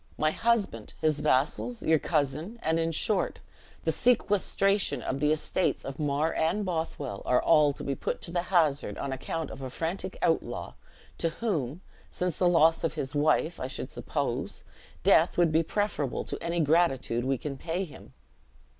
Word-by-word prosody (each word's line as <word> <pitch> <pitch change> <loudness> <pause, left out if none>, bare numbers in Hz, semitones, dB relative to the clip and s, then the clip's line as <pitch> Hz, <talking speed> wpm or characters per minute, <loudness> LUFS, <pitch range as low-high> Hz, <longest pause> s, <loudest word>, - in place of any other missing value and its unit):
My 155 0 +2
husband, 205 - 0
his 155 -2 +1
vassals, 155 - 0
your 160 -1 +4
cousin, 155 - -1
and, 160 +1 +1
in 165 0 0
short, 195 +5 +1 0.5
the - - +2
sequestration 205 -4 +2
of 135 - -2
the 150 +1 +2
estates 155 +4 0
of 135 +2 -6
Mar 150 +2 0
and 180 +6 0
Bothwell, 160 - -3
are 125 - +3
all 150 -3 +5
to - - -9
be 140 - -1
put - - -3
to - - -4
the 175 0 0
hazard 160 -6 +1
on 140 - -3
account 160 +4 -4
of - - -9
a 130 - -4
frantic 165 - -3
outlaw, - - 0 0.5
to 165 - +2
whom, 165 - -2 0.3
since 180 -3 -3
the 180 - +4
loss 165 -1 +4
of 165 - -1
his 135 -1 -3
wife, 155 +3 +2
I 130 - -3
should 130 - -6
suppose, - - -3 0.4
death - - +4
would 175 -2 +4
be 160 +1 +4
preferable 165 -6 -1
to - - -6
any 170 0 0
gratitude 145 -7 +2
we 135 +1 0
can 140 +2 -5
pay 170 +6 -3
him." 165 - -12
160 Hz, 170 wpm, -28 LUFS, 140-175 Hz, 0.5 s, all